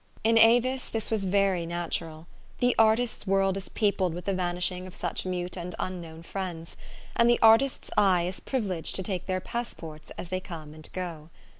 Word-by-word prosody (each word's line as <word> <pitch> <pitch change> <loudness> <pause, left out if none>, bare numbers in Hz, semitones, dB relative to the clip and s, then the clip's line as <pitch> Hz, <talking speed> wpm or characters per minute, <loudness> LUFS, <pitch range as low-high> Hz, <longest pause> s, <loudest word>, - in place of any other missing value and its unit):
In 225 +1 +4
Avis 245 +3 +4
this 225 -1 -3
was 215 -3 +1
very 190 -3 +2
natural. 165 -2 -4 0.3
The 245 0 +2
artist's 225 0 +3
world 195 0 +3
is 195 -1 -6
peopled 195 -5 +1
with 175 - -7
the 195 - +1
vanishing 180 0 -1
of 185 - -10
such - - -3
mute 180 -1 -2
and 180 -1 -5
unknown 170 -3 -5
friends; 170 -3 -5 0.4
and 235 0 +5
the 240 - +5
artist's 225 +4 +5
eye 185 -4 +4
is 180 +2 -3
privi 260 -5 -2 0.2
leged - - -4
to 190 - -2
take 185 -2 -3
their 185 -1 0
passports 165 -9 -6
as 175 - -6
they 185 0 -1
come 160 -5 -8
and 155 0 -8
go. 170 -4 -5
185 Hz, 185 wpm, -28 LUFS, 175-220 Hz, 0.4 s, and